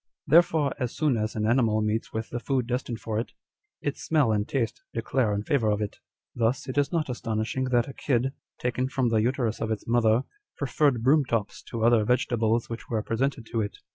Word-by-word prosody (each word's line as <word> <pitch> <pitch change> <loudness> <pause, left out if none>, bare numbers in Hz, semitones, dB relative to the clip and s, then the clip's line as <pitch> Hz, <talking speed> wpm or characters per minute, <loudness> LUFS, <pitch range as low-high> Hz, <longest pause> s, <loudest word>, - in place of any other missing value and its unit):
Therefore 160 -2 +4
as 125 -3 -2
soon 150 -5 +2
as 110 -1 -2
an 105 -1 0
animal 115 -2 +3
meets 105 +1 -1
with 110 0 -4
the 120 - -2
food 130 -1 0
destined 120 -1 -3
for 110 -1 -2
it, 115 - -5 0.5
its 145 - -2
smell 150 -8 +3
and 105 -1 0
taste 120 -3 -1
declare 115 0 +1
in 100 0 -1
favour 115 -3 +1
of 105 0 +1
it. 105 -1 -4 0.3
Thus 120 +2 0
it 130 - -4
is 145 0 +2
not 165 -3 0
astonishing 115 0 -2
that 120 -2 +2
a 135 - -7
kid, 130 -1 0 0.3
taken 125 +1 -1
from 130 -2 +1
the 110 -1 +2
uterus 120 -1 0
of 115 - -1
its 110 -2 -3
mother, 115 0 +3 0.3
preferred 140 -3 +1
broom 145 +4 +5
tops 115 -5 -2
to 115 -1 -3
other 115 -2 +5
vegetables 115 -1 +1
which 115 0 -7
were 110 -2 -1
presented 125 +2 -1
to 115 -1 +1
it. 105 - -4
120 Hz, 205 wpm, -27 LUFS, 110-130 Hz, 0.5 s, broom